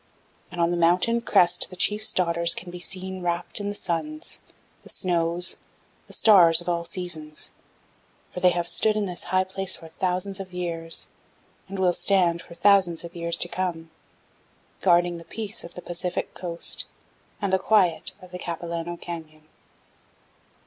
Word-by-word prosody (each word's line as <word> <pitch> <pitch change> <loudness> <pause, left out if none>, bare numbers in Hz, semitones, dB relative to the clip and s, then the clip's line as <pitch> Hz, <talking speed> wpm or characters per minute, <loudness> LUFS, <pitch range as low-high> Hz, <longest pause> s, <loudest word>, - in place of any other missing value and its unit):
"And 175 - -7
on 170 0 +3
the 175 - 0
mountain 180 +8 +3
crest 175 -5 +3
the 185 - -10
chief's 210 +4 +1
daughters 170 -1 +1
can 175 0 -7
be 180 - -8
seen 185 +1 -4
wrapped 175 +2 -2
in 205 0 -2
the 205 - -4
suns, 305 - -4 0.4
the - - -15
snows, 175 0 0 0.5
the - - -11
stars 175 -7 +7
of 175 - -6
all 170 -1 0
seasons, 165 -3 -4 0.8
for - - -4
they 180 - +6
have 175 -1 -1
stood 215 +3 +2
in 210 - +1
this 180 -2 -3
high 185 +1 +2
place 190 0 -1
for 165 - -12
thousands 185 +3 -2
of 190 -1 -8
years, 165 -2 0 0.6
and 195 - -5
will 185 -2 +3
stand 175 -3 +2
for 170 - -13
thousands 190 -3 +4
of 170 0 -9
years 170 0 -1
to 175 - 0
come, 170 -3 -3 0.9
guarding 175 -1 +3
the - - -11
peace 220 +4 -5
of 170 - -11
the 180 - -8
Pacific 175 +1 -3
Coast 170 -2 -1 0.5
and 200 -3 -1
the 190 - +4
quiet 190 -4 +2
of 180 - -13
the 180 - -6
Capilano 170 0 -4
Canyon." 160 -3 -8
175 Hz, 165 wpm, -25 LUFS, 170-190 Hz, 0.9 s, stars